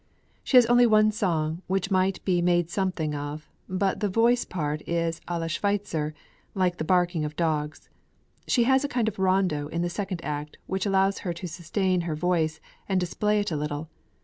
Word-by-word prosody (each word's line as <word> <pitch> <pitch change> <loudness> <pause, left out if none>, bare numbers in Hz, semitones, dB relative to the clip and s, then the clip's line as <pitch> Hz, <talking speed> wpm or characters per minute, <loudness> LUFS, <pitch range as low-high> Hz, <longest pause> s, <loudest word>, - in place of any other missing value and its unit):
"She 260 - +4
has 245 - +8
one 220 -3 +5
song, 170 -6 -1
which 195 +1 -1
might 185 0 +1
be 180 -2 +2
made 175 -1 +2
something 180 -5 -1
of, 145 +1 -5 0.2
but 190 +1 0
the 210 - 0
voice 235 +4 +3
part 150 -3 -3
is 170 -1 -1
à 175 -1 -2
la 165 - -2
Schweitzer, 165 -3 -1 0.4
like 180 -2 +1
the - - -2
barking 175 -1 +2
of 150 0 -4
dogs; 155 -3 -2 0.6
she 240 - +3
has 265 +3 +3
a - - 0
kind 240 -4 0
of 210 - -3
rondo 185 -6 +1
in 170 +3 -2
the 175 - -2
second 190 -3 -4
act, 150 0 -4
which 190 +2 -2
allows 195 0 +2
her 175 - -3
to 175 - -8
sustain 180 +2 -1
her 165 -2 -3
voice, 160 -1 0 0.3
and 190 -1 +2
display 210 +4 0
it 205 - -3
a - - -1
little. 150 +1 -3
180 Hz, 190 wpm, -26 LUFS, 160-195 Hz, 0.6 s, has